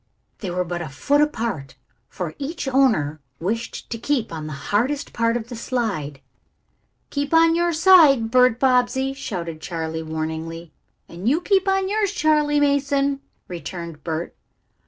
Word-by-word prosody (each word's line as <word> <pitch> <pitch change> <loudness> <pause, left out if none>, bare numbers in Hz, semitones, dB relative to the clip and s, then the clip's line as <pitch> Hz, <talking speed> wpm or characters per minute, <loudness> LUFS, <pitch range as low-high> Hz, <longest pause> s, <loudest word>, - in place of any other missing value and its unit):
They 195 - -4
were 180 +1 -1
but 175 0 -4
a 160 - -5
foot 285 - +1
apart, 225 - -2 0.3
for 175 -4 -5
each 290 +1 -4
owner 225 - +2 0.2
wished 225 +7 -3
to 230 - -3
keep 240 -7 -1
on 155 -1 -5
the 155 - -5 0.2
hardest 265 +7 0
part 230 0 +1
of 235 0 -7
the 245 - -6
slide. 205 - -3 0.9
"Keep 285 +2 -1
on 330 0 +6
your 345 +1 +2
side, 310 -9 +6
Bert 250 -2 +4
Bobbsey!" 265 +1 +2
shouted 170 -11 -5
Charley 160 -2 -4
warningly. 160 +1 -5 0.4
"And 180 +7 -2
you 300 +5 +3
keep 385 +1 +1
on 385 0 +2
yours, 410 -1 0
Charley 300 -3 +2
Mason!" 280 -1 +1 0.3
returned 170 -3 -7
Bert. 165 0 -4
235 Hz, 150 wpm, -22 LUFS, -, 0.9 s, on